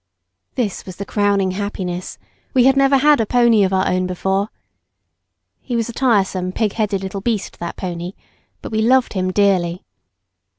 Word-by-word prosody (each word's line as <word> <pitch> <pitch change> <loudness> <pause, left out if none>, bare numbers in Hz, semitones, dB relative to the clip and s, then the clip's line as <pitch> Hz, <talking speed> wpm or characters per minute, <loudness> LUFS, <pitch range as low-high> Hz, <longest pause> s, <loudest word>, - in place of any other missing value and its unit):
This 225 -6 -2
was 185 - -9
the 200 - -6
crowning 200 -2 +1
happiness; 185 -2 -4 0.4
we 255 - +5
had 270 +1 +5
never 275 0 +4
had 295 -1 +4
a - - 0
pony 235 -3 +4
of 190 - +1
our 190 0 +1
own 185 0 0
before. 190 +3 -1 1.1
He 245 - -4
was 230 0 -1
a - - -6
tiresome, 195 -7 +1
pigheaded 210 -2 -1
little 195 +1 -5
beast 220 -2 -2
that 170 0 -5
pony; 175 0 -5 0.5
but - - -7
we 220 0 0
loved 255 +3 +3
him 185 -2 -1
dearly. 185 -3 +1
200 Hz, 165 wpm, -19 LUFS, 185-235 Hz, 1.1 s, we